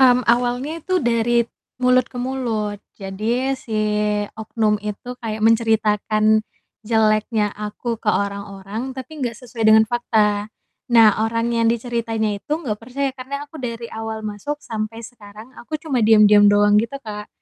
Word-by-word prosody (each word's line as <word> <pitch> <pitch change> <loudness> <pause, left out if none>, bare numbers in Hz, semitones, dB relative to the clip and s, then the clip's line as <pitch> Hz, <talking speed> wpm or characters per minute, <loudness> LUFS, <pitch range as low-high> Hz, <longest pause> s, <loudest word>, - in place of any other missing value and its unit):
Mmm, 250 -1 +5
awalnya 245 +7 +1
itu 370 +4 -2
dari 235 0 +2
t 235 - -29 0.3
mulut 250 -1 +4
ke - - -12
mulut. 235 -5 -2 0.2
Jadi 220 +7 -2
si 225 -4 -5 0.6
oknum 215 -1 0
itu 210 +4 -6
kayak 220 -2 -4
menceritakan 215 -1 +3 0.4
jeleknya 215 -1 +1
aku 210 +2 -5
ke 215 - -3
orang-orang, 200 +4 -3
tapi 295 +4 -8
enggak 240 -3 -2
sesuai 230 -2 -1
dengan 220 0 +7
fakta. 215 -3 +1 0.5
Nah 225 -2 +8 0.2
orang 230 +1 -1
yang 230 -1 +2
diceritainnya 225 -3 -1
itu 295 - -6
enggak 245 -11 -4
percaya 270 +4 -2
karena 270 +2 -6
aku 295 +1 -11
dari 235 -2 -5
awal 220 0 -5
masuk 215 +8 -4
sampai 225 +1 -5
sekarang, 215 +1 -13
aku 310 +6 -4
cuma 300 -5 -2
diam-diam 210 -2 +6
doang 205 0 +5
gitu, 230 +5 -4
Kak. 210 -1 -7
225 Hz, 150 wpm, -21 LUFS, 210-245 Hz, 0.6 s, Nah